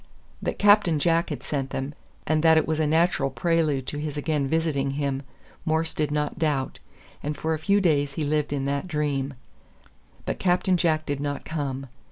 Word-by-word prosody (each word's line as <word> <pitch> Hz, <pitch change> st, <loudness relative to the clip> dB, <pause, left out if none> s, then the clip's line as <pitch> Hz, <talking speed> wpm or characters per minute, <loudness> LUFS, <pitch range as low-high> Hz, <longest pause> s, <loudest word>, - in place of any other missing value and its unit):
That -, -, -2 dB
Captain 205 Hz, -5 st, +5 dB
Jack 165 Hz, +2 st, +2 dB
sent 135 Hz, -2 st, -2 dB
them, 135 Hz, +2 st, -4 dB, 0.3 s
and 155 Hz, 0 st, +2 dB
that 160 Hz, 0 st, +6 dB
it 160 Hz, -, +3 dB
was 160 Hz, 0 st, 0 dB
a 155 Hz, -, +2 dB
natural 160 Hz, -2 st, +2 dB
prelude 150 Hz, 0 st, +1 dB
to 145 Hz, -, -4 dB
his 150 Hz, -1 st, -4 dB
again 145 Hz, -2 st, 0 dB
visiting 155 Hz, -3 st, 0 dB
him, 140 Hz, -2 st, -1 dB, 0.4 s
Morse 160 Hz, 0 st, 0 dB
did 150 Hz, -2 st, 0 dB
not 150 Hz, +1 st, -1 dB
doubt, 145 Hz, -5 st, 0 dB, 0.4 s
and 150 Hz, +1 st, -3 dB
for 160 Hz, 0 st, -1 dB
a 155 Hz, -, -2 dB
few 200 Hz, +5 st, +3 dB
days 145 Hz, -6 st, +2 dB
he 155 Hz, -, -2 dB
lived 150 Hz, 0 st, 0 dB
in 140 Hz, -2 st, -1 dB
that 140 Hz, +4 st, -1 dB
dream. 145 Hz, -4 st, -1 dB, 0.9 s
But -, -, -3 dB
Captain 180 Hz, 0 st, +2 dB
Jack 160 Hz, -3 st, +1 dB
did 145 Hz, -1 st, -2 dB
not 145 Hz, 0 st, -3 dB
come. 140 Hz, -4 st, -3 dB
150 Hz, 185 wpm, -25 LUFS, 140-160 Hz, 0.9 s, that